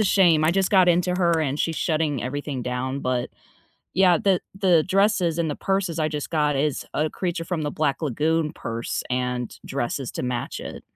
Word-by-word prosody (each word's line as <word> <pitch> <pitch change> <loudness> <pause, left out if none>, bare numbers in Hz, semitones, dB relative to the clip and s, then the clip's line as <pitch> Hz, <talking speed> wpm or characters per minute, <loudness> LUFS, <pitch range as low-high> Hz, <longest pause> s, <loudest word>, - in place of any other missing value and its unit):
a - - +3
shame. 175 -6 +4
I 155 - +4
just 190 +1 +1
got 185 -3 +5
into 180 +1 +2
her, 170 -3 +2
and 145 -1 -1
she's 165 -1 -1
shutting 155 -5 0
everything 135 0 -4
down. 130 +2 -3
But 125 -2 -1 0.6
yeah, 180 -3 +5
the 190 -3 +2 0.2
the 180 -5 +4
dresses 190 -3 +2
and 165 -2 0
the 145 - -4
purses 195 -4 -1
I 155 0 +1
just 150 -1 -4
got 150 -3 +1
is 150 0 0
a 155 +1 0
creature 175 -2 -3
from 165 -2 -2
the 145 - -1
Black 150 0 -1
Lagoon 155 +3 0
purse 115 -4 -4
and 125 -1 -2
dresses 135 0 -3
to - - -4
match 125 -1 -3
it. - - -7
155 Hz, 195 wpm, -24 LUFS, 135-175 Hz, 0.6 s, got